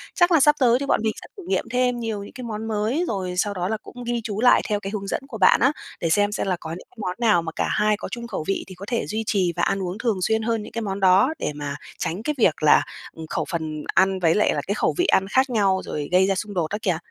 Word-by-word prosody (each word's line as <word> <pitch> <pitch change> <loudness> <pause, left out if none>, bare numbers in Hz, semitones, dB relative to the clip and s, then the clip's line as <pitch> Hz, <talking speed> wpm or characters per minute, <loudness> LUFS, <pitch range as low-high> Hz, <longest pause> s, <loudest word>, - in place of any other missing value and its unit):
Chắc 350 0 +4
là 325 - +6
sắp 295 +2 +5
tới 245 -3 +4
thì 280 - -3
bọn - - +2
mình 220 - +2
sẽ - - -11
thử 385 - -9
nghiệm 390 - +1
thêm 250 0 +1
nhiều 220 -3 -3
những - - -12
cái 250 0 -8
món 220 -1 -5
mới 220 +10 0
rồi 185 -3 -3
sau 205 +1 +1
đó 180 -2 -2
là 220 +2 -1
cũng 245 - -10
ghi 240 0 -2
chú 215 -1 -3
lại 245 - +6
theo 210 -1 +1
cái 195 -1 -6
hướng 200 -2 -4
dẫn - - -2
của 230 -5 -7
bạn - - +5
á, 265 +4 +5 0.3
để 165 - -1
xem 205 +5 +2
xem 205 - -2
là 185 - +1
có 160 - -8
những 170 +3 -8
món 185 -4 -3
nào 215 -7 +4
mà 165 -1 -5
cả - - 0
hai 210 0 +2
có - - -6
chung 235 -1 -5
khẩu 160 - -4
vị 195 - -1
thì 190 - -10
có 190 +3 -9
thể 235 -2 -1
duy 220 +1 -2
trì 185 -5 +1
và - - -1
ăn 195 - 0
uống 180 +2 -4
thường 220 -5 -1
xuyên 220 +5 +1
hơn 225 -1 -1
những - - -10
cái 230 - -3
món 195 -2 -3
đó 195 +9 +4
để - - -2
mà 145 -1 -4 0.2
tránh 180 +6 -3
cái 300 +3 -1
việc 175 -10 +2
là, 150 - +6 0.3
ừm, 160 -1 -9
khẩu - - -2
phần 155 -3 -4
ăn 190 0 +3
với 165 -2 +3
lại 210 - +3
là - - -1
cái 200 - 0
khẩu - - +1
vị 355 - +2
ăn 190 - +3
khác 260 +6 +2
nhau 195 -5 +2
rồi 145 -1 -4
gây 185 +1 +4
ra 195 - +1
xung 205 +2 -4
đột 175 -3 0
đó 205 - -1
kìa. 180 -4 0
210 Hz, 305 wpm, -23 LUFS, 185-235 Hz, 0.3 s, là